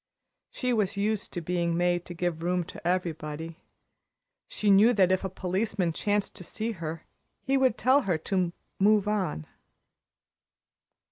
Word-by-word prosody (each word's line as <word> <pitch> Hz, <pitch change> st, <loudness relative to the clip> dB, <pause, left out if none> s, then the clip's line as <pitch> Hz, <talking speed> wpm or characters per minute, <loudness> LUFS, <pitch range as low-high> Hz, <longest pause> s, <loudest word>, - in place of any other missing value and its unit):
She 250 Hz, -1 st, -1 dB
was 205 Hz, -3 st, 0 dB
used 210 Hz, 0 st, 0 dB
to 175 Hz, -, -3 dB
being 170 Hz, 0 st, -1 dB
made 175 Hz, 0 st, +1 dB
to 175 Hz, -, -8 dB
give 170 Hz, -1 st, -2 dB
room 180 Hz, +1 st, 0 dB
to 170 Hz, -, -8 dB
everybody. 165 Hz, -2 st, -3 dB, 0.9 s
She 210 Hz, -1 st, +1 dB
knew 210 Hz, +5 st, +6 dB
that 185 Hz, -4 st, +4 dB
if 185 Hz, +1 st, +1 dB
a 190 Hz, -, -2 dB
policeman 185 Hz, -1 st, -1 dB
chanced 205 Hz, +3 st, 0 dB
to 185 Hz, -, -8 dB
see 220 Hz, +6 st, -3 dB
her, 165 Hz, -5 st, -6 dB, 0.4 s
he 270 Hz, -, +1 dB
would 260 Hz, -4 st, +3 dB
tell 260 Hz, +4 st, +4 dB
her 185 Hz, -, 0 dB
to 180 Hz, +2 st, -1 dB, 0.3 s
"move 205 Hz, +1 st, +4 dB
on." 190 Hz, -, -1 dB
185 Hz, 150 wpm, -28 LUFS, 170-210 Hz, 0.9 s, knew